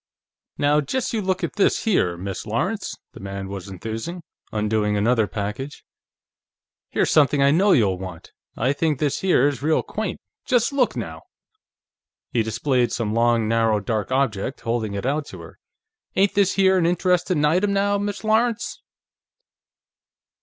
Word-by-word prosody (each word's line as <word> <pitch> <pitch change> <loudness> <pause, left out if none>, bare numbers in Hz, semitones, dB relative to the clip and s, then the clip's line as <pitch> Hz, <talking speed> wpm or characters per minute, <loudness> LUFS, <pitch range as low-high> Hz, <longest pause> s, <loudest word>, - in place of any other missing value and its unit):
"Now, 145 +1 +3
just 240 - -2
you 220 - 0
look 185 -1 -1
at - - -3
this 200 - +2
here, 90 - +1
Miss 95 +1 -5
Lawrence," - - -2 0.2
the - - -11
man 95 0 -6
was 100 -1 -6
enthusing, 115 - -6 0.3
undoing 105 -1 0
another 110 +1 +2
package. 105 +8 -5 1.0
"Here's - - +1
something 145 -1 +4
I 140 - +5
know 195 +7 +4
you'll 100 - +3
want; 95 -3 -8 0.3
I 125 +4 +1
think 150 0 0
this 145 0 0
here 175 -8 +3
is 145 -2 -2
real 155 +2 +2
quaint! - - -4 0.2
Just 245 +2 +1
look, 265 -3 +2
now!" - - -5 1.1
He 120 - +2
displayed 120 +3 0
some 110 -3 -2
long, 115 -1 +2
narrow, 115 -1 +2
dark 110 +3 -2
object, 130 -2 -1
holding 115 -3 -2
it 100 - -4
out 145 +2 -1
to - - -10
her. - - -13 0.6
"Ain't 195 +1 +3
this 200 -2 +2
here 190 -1 +4
an 165 - +2
interestin' 180 -2 +1
item, 180 +7 +2
now, 200 0 +1
Miss 205 -1 -3
Lawrence?" 225 +1 0
135 Hz, 155 wpm, -23 LUFS, -, 1.1 s, I